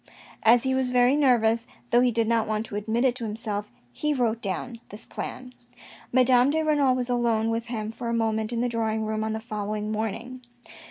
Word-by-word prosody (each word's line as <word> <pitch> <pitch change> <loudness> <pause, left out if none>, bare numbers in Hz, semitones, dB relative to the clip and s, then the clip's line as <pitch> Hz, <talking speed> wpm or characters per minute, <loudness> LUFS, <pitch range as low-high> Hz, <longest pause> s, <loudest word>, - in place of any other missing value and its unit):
As 230 +1 +5
he 265 0 +1
was 260 -1 +1
very 250 +2 +4
nervous, 235 -5 +3 0.2
though 240 - +5
he 250 - +4
did 230 -1 +1
not 230 -1 +1 0.3
admit 220 +4 0
it 255 - +3
to 240 - -6
him 210 -1 -4
self, 210 - -4 0.2
he 300 -1 -1
wrote 235 -3 0
down 220 +5 -4
this 210 +3 -7
plan. 255 0 -7 0.6
Madame 255 0 +5
de 315 +2 +1
Renal 290 -4 +3
was 250 -1 -1
alone 230 -2 +1
with 230 +1 -2
him 220 -2 -4
for 235 +1 -5
a - - -1
moment 220 -1 0
in 235 -1 -1
the 245 - +1
drawing 220 -2 -1
room 215 0 -2
on 220 0 -2
the 220 - -3
following 215 -1 -4
morning. 225 +4 -4
230 Hz, 205 wpm, -26 LUFS, 220-250 Hz, 0.6 s, As